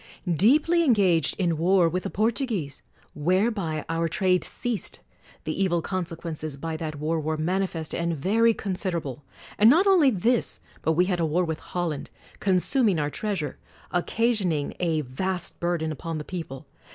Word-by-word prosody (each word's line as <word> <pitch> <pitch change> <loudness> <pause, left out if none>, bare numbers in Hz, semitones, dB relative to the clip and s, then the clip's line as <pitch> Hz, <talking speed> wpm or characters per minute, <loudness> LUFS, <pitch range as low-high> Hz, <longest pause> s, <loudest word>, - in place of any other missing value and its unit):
Deeply 305 - +4
engaged 190 - +3
in 170 -4 +1
war 180 +1 +4
with 180 +3 -1
the - - -4
Portuguese; 215 - -1 0.3
whereby 180 0 0
our 165 0 0
trade 180 +1 +1
ceased: 240 -4 -3 0.4
the 195 - -1
evil 175 -3 +2
consequences 165 -4 -4
by 160 +3 -4
that 155 -1 -4
war 155 +3 -1
were 155 +1 -2
manifest 170 0 -2
and 170 -1 -1
very 225 +10 +3
considerable. 175 - -3 0.4
And 215 +2 +8
not 335 +9 +5
only 365 -8 +6
this, 235 +2 +1 0.2
but 160 - +1
we 180 +3 +3
had 180 -2 -1
a 165 - +2
war 175 +4 +1
with 160 -1 -3
Holland; 170 -5 -3 0.3
consuming 195 - +2
our 150 -1 -1
treas 205 -2 -2
ure; 150 - -5 0.3
occasioning 180 -5 0
a 165 -3 +1
vast 175 +7 -3
burden 170 -2 -1
upon 160 +2 -5
the 150 - -6
people. 160 -7 -6
175 Hz, 155 wpm, -26 LUFS, 160-200 Hz, 0.4 s, And